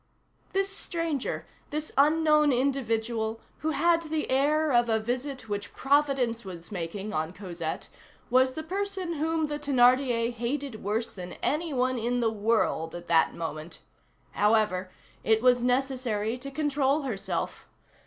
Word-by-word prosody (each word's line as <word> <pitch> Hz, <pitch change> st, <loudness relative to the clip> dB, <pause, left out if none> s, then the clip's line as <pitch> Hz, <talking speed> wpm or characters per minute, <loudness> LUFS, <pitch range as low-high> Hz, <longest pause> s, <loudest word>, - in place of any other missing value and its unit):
This 390 Hz, 0 st, +1 dB
stranger, 330 Hz, -8 st, -2 dB, 0.2 s
this 305 Hz, +1 st, -3 dB
unknown 300 Hz, +1 st, +4 dB
individual, 230 Hz, -4 st, 0 dB, 0.2 s
who 315 Hz, -, -1 dB
had 335 Hz, +2 st, +3 dB
the 315 Hz, -3 st, -3 dB
air 300 Hz, +3 st, +3 dB
of 240 Hz, -1 st, +4 dB
a 220 Hz, 0 st, +3 dB
visit 250 Hz, +2 st, -3 dB
which 205 Hz, -1 st, -4 dB
Providence 270 Hz, -4 st, +2 dB
was 180 Hz, -1 st, -9 dB
making 195 Hz, +3 st, -4 dB
on 160 Hz, +2 st, -2 dB
Cosette, 175 Hz, -4 st, -5 dB, 0.4 s
was 260 Hz, +1 st, +4 dB
the 315 Hz, -, -5 dB
person 380 Hz, 0 st, -3 dB
whom 320 Hz, +1 st, 0 dB
the 295 Hz, 0 st, -3 dB
Thénardier 250 Hz, -3 st, +3 dB
hated 240 Hz, +1 st, -3 dB
worse 215 Hz, +4 st, -1 dB
than 180 Hz, -2 st, -8 dB
any 320 Hz, +2 st, 0 dB
one 255 Hz, -1 st, +1 dB
in 240 Hz, +2 st, 0 dB
the 230 Hz, -2 st, +2 dB
world 210 Hz, -7 st, 0 dB
at 175 Hz, 0 st, -8 dB
that 165 Hz, -1 st, +4 dB
moment. 160 Hz, 0 st, -6 dB, 0.5 s
However, 210 Hz, -3 st, +2 dB, 0.3 s
it 220 Hz, 0 st, +4 dB
was 250 Hz, -1 st, +5 dB
necessary 250 Hz, -4 st, 0 dB
to 265 Hz, +2 st, -7 dB
control 285 Hz, 0 st, +1 dB
herself. 220 Hz, -8 st, -3 dB
250 Hz, 140 wpm, -28 LUFS, 215-295 Hz, 0.5 s, was